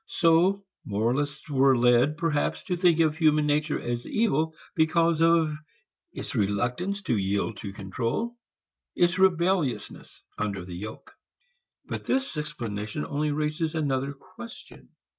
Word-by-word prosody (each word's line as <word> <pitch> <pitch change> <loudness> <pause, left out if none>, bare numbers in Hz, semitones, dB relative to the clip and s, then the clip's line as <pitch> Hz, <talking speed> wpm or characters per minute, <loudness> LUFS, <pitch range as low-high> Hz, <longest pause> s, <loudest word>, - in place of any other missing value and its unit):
So 180 +4 +3 0.2
moralists 130 +9 -1
were 135 -2 +4
led, 125 +5 +4
perhaps, 165 -3 0
to 180 - -2
think 170 -2 +3
of 155 -2 +2
human 155 -2 +3
nature 150 +1 +1
as 120 0 -4
evil 160 -8 +1 0.2
because 165 0 +2
of 165 -2 +4 0.6
its - - -6
reluctance 125 - -1
to 170 - +1
yield 100 +2 -1
to 100 - -6
control, 115 - -3 0.6
its 175 +1 +2
rebelliousness 175 -6 0 0.2
under 100 -4 -2
the 90 - -8
yoke. 110 - -8 0.7
But - - -5
this 265 -6 0
explanation 120 -5 -4
only 150 +1 -1
raises 155 +2 -1
another 140 -3 -1
question. 185 - -12
150 Hz, 125 wpm, -27 LUFS, 120-170 Hz, 0.7 s, were